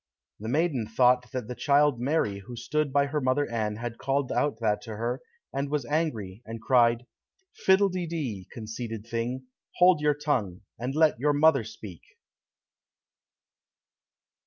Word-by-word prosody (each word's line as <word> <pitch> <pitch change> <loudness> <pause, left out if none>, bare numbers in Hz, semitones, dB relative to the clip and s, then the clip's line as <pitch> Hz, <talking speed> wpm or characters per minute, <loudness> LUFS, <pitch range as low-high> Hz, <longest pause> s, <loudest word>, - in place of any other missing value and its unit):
The 110 +2 -5
maiden 140 -5 +1
thought 125 +2 +3
that 125 -4 -4
the 125 - -4
child 140 +1 +3
Mary 125 -8 0
who 110 +5 -9
stood 145 +4 -1
by 140 +1 +3
her 145 +1 -2
mother 130 +3 +1
Anne 110 -2 -1
had 115 +1 -6
called 135 -1 0
out 145 -6 0
that 105 -3 0
to 110 -3 -7
her, 120 +4 -2 0.3
and 140 +1 -2
was 145 -3 -1
angry, 120 - -2
and 115 0 -7
cried, 120 0 +3 0.5
"Fiddle 195 +1 +4
de 180 -2 -3
dee, 130 - -4
conceited 110 -1 -6
thing, 120 +3 -3 0.3
hold 180 -3 +5
your 150 -1 +3
tongue, 125 - -1 0.2
and 125 +4 -3
let 155 -5 +3
your 145 +3 +2
mother 145 -3 +4
speak!" 105 -5 -10
125 Hz, 155 wpm, -27 LUFS, 115-145 Hz, 0.5 s, hold